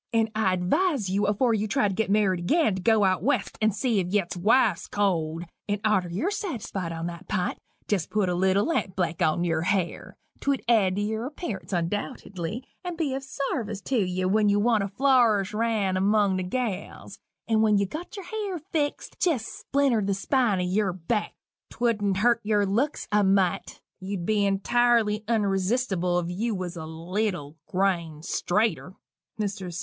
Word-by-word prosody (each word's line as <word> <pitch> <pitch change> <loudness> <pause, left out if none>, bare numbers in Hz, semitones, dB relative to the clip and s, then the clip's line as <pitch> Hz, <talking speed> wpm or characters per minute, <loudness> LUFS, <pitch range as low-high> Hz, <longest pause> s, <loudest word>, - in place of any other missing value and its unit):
And 225 -1 +1
I 215 -4 +2
advise 210 - +1
you 200 +2 +1
afore 225 +4 +2
you 215 0 0
try 215 -1 +2
to 195 - -2
git 220 +1 -1
married 190 -4 +1
agin, 320 - +3
to - - -5
go 220 +1 +4
out 185 -1 +2
West 290 - 0
and 220 0 +4
see 225 +1 0
'f 175 - -4
yet 190 -2 0
wife's 215 +9 +2
cold 170 -5 0 0.3
and 205 0 0
arter 190 -5 +2
ye're 205 - -1
satisfied 230 - -4
on 165 0 -4
that 175 +1 -7
pint, 185 -4 -1 0.3
jest 190 -6 0
put 210 -3 +1
a 180 - 0
little 190 +3 +2
lampblack 185 - -1
on 155 +2 +2
yer 165 -2 0
hair 185 0 -2 0.2
'twould 280 -2 0
add 205 -6 +3
to 205 - -1
yer 220 +3 -2
appearance 205 - -6
undoubtedly, 185 +3 -3 0.2
and 355 -2 -5
be 305 -5 -1
of 270 - -3
sarvice 260 -6 -3
tew 230 +1 0
you 185 0 -1
when 210 +2 +3
you 205 0 +3
want 220 0 +3
to 195 - -1
flourish 220 -3 +3
round 210 -4 0
among 200 0 +3
the - - -1
gals 205 +1 -4 0.3
and 220 -1 +3
when 215 -2 +4
ye've 200 -1 0
got 345 +6 -7
yer 395 - -6
hair 400 0 -4
fixt, 300 -2 -3
jest 290 -11 +1
splinter 275 -5 +1
the 200 -1 0
spine 230 0 +1
o' - - 0
yerback 190 +2 -1 0.4
'twould'n' 210 -5 0
hurt 235 +3 +3
yer 210 -1 +2
looks 235 +10 -1
a 210 0 +4
mite 190 -2 +1 0.2
you'd 190 -2 -4
be 205 0 +2
intirely 215 +1 +2
unresistible 195 -3 +1
if - - -5
you 225 +2 -1
was 185 -1 -4
a 160 -2 -6
leetle 170 -1 -3
grain 170 -5 -1
straiter." 195 +1 0 0.4
MR. 195 -4 -3
205 Hz, 175 wpm, -26 LUFS, 185-230 Hz, 0.4 s, go